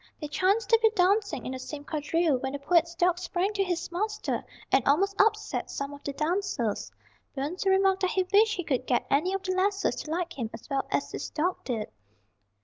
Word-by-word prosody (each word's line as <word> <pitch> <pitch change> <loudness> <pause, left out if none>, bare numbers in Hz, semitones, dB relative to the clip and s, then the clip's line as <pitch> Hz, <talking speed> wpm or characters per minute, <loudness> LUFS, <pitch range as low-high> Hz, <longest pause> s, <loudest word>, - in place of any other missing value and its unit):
They 300 - -4
chanced 390 +8 +2
to 455 - +7
be 445 - +6
dancing 400 +2 +2
in - - -3
the 260 - -5
same 285 +3 -7
quadrille 305 -1 0
when 265 +1 -3
the - - -2
poet's 335 +3 +2
dog 355 0 +2
sprang 365 +3 -1
to 400 -1 +1
his 355 -1 -3
master 425 +4 -2 0.3
and 265 - +4
almost 390 +8 +3
upset 430 0 0
some 280 +1 -4
of 285 - -12
the 285 - -3
dancers. 305 - -1 0.4
Burns 305 +8 -3
remarked 385 0 +3
that 370 - +2
he 375 - +1
wished 425 +1 +5
he 355 - -3
could 260 -4 -1
get 245 - +1
any 310 +7 +3
of 390 - -4
the 370 - -1
lasses 395 +2 +1
to - - -6
like 340 -2 -3
him 230 -3 -2
as 225 - -13
well 275 -1 0
as - - -1
his - - -5
dog 350 +4 0
did. 225 -5 -3
355 Hz, 215 wpm, -28 LUFS, 285-390 Hz, 0.4 s, to